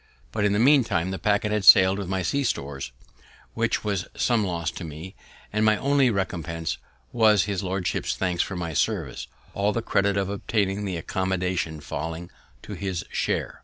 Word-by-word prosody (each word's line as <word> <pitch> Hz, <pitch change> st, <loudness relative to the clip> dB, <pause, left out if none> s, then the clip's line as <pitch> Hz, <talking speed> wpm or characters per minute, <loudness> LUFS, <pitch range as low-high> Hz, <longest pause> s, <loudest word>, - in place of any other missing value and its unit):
But, 105 Hz, -2 st, 0 dB
in 100 Hz, -, +2 dB
the -, -, +1 dB
meantime, 115 Hz, -, +3 dB
the 95 Hz, -, -4 dB
packet 105 Hz, 0 st, +1 dB
had 105 Hz, -1 st, 0 dB
sailed 95 Hz, +1 st, +8 dB
with 100 Hz, -, -4 dB
my 95 Hz, -1 st, -1 dB
sea 140 Hz, +6 st, 0 dB
stores, 70 Hz, -, -3 dB, 0.6 s
which -, -, 0 dB
was 100 Hz, -3 st, -2 dB
some 120 Hz, -3 st, +2 dB
loss 85 Hz, -4 st, -2 dB
to -, -, -8 dB
me, 80 Hz, +4 st, -8 dB, 0.4 s
and 110 Hz, 0 st, +1 dB
my 110 Hz, -1 st, +4 dB
only 140 Hz, -2 st, +3 dB
recompense 85 Hz, -6 st, -3 dB, 0.3 s
was 110 Hz, -4 st, +4 dB
his 100 Hz, -2 st, -2 dB
lordship's 95 Hz, -1 st, -2 dB
thanks 90 Hz, -2 st, 0 dB
for 95 Hz, -, -3 dB
my 85 Hz, -2 st, -4 dB
service, -, -, -1 dB, 0.3 s
all 100 Hz, +1 st, +1 dB
the 115 Hz, +1 st, -2 dB
credit 100 Hz, -2 st, +1 dB
of 100 Hz, -1 st, 0 dB
obtaining 100 Hz, 0 st, -1 dB
the 95 Hz, -3 st, -3 dB
accommodation 90 Hz, -2 st, -2 dB
falling 80 Hz, +4 st, -5 dB, 0.3 s
to -, -, -7 dB
his 95 Hz, -3 st, -4 dB
share. -, -, -2 dB
95 Hz, 175 wpm, -25 LUFS, 90-105 Hz, 0.6 s, sailed